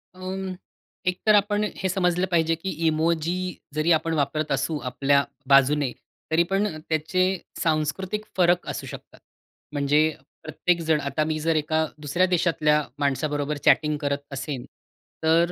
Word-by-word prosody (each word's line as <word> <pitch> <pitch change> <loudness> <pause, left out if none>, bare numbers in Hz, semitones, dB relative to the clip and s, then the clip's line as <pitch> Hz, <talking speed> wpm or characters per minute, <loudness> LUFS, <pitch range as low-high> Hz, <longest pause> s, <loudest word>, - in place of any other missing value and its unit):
अ, - - -16 0.9
एक 180 0 0
तर 215 - +7
आपण 205 +1 +2
हे 190 - -1
समजलं 180 -1 +1
पाहिजे, 165 -1 +2
की 180 +4 -5 0.2
इमोजी 160 +2 +1 0.4
जरी 155 +3 +1
आपण 165 +1 -3
वापरत 155 0 -1
असू 160 -2 0
आपल्या 140 +2 +2 0.3
बाजूने 140 0 +4 0.4
तरी 165 +2 +4
पण 195 +2 +2
अ, 155 - -6
त्याचे 160 +4 +1 0.4
सांस्कृतिक 175 +6 -1
फरक 175 0 +3
असू - - -5
शकतात. - - -11 0.5
म्हणजे 145 +1 +3 0.4
प्रत्येक 170 +2 0
जण 160 -2 +2
आता 140 +2 0
मी 155 0 -2
जर 165 +1 +1
एका 155 +1 +1 0.2
दुसऱ्या 150 +6 +2
देशातल्या 155 -4 +2 0.2
माणसाबरोबर 145 +1 -1
चॅटिंग 150 -1 +4
करत 140 0 0
असेन 135 -2 -4 0.6
तर 165 +2 +3
160 Hz, 145 wpm, -25 LUFS, 150-175 Hz, 0.9 s, तर